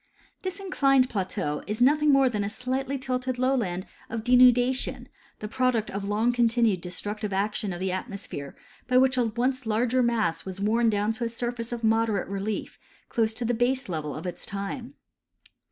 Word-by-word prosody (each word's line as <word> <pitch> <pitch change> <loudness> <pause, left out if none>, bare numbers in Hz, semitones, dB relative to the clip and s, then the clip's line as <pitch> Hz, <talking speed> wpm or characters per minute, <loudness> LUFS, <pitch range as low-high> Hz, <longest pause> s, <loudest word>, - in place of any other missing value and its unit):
This 375 +1 -4
inclined 275 -9 +2
plateau 185 -7 -2
is 210 +2 -3
nothing 295 +4 +4
more 275 -1 +5
than 210 -5 -1
a 200 - -2
slightly 260 +4 -2
tilted 255 -1 -2
lowland 235 -8 0 0.2
of 225 -1 -4
denudation, 250 +1 +4 0.3
the 210 - -6
product 250 -2 0
of 200 +1 -4
long 220 +4 +2
continued 230 -5 +2
destructive 205 +4 -4
action 205 +1 -1
of 175 - -5
the 190 0 -1
atmosphere 185 - -6 0.3
by 255 0 +3
which 260 0 +4
a 250 -2 +2
once 245 +2 -1
larger 240 +4 +2
mass 230 -9 +1
was 190 0 -7
worn 225 +3 +2
down 210 0 +1
to 240 +2 -4
a 230 - 0
surface 235 0 -4
of 235 -1 -4
moderate 220 -2 +2
relief 200 +2 -4 0.3
close 225 -2 +1
to 240 - -2
the 240 - +1
baselevel 225 - -1
of 155 - -7
its 175 -1 -5
time. 200 +7 -5
230 Hz, 170 wpm, -26 LUFS, 205-255 Hz, 0.3 s, more